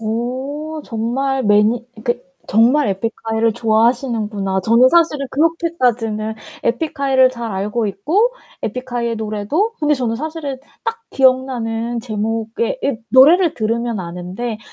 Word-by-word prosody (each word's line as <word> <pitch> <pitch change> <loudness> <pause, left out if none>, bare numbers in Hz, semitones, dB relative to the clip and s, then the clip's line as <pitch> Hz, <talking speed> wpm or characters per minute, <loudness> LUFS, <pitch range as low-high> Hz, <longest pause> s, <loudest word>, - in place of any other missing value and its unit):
어. 260 +8 -3
정말 260 +4 -1
매니 210 +3 +3 0.2
그러니까 245 +2 -2 0.2
정말 245 +7 +4
에픽하이를 225 +2 -1
좋아하시는구나. 220 -4 +1
저는 230 +6 +5
사실은 310 -4 +2
그렇게까지는 250 -9 0 0.3
에픽하이를 270 -1 +2
잘 235 -2 -5
알고 210 +4 -1
있고 335 - +1 0.3
에픽하이의 240 0 -3
노래도 220 - -1
근데 300 0 +3
저는 245 -4 -1
사실은 300 0 -4 0.3
딱 455 0 -3
기억나는 240 -3 +1
제목의 225 - -2
이 275 -4 0
노래를 315 +6 +6
들으면 230 0 -1
아는데 180 +6 -5
240 Hz, 315 characters per minute, -18 LUFS, 220-275 Hz, 0.3 s, 노래를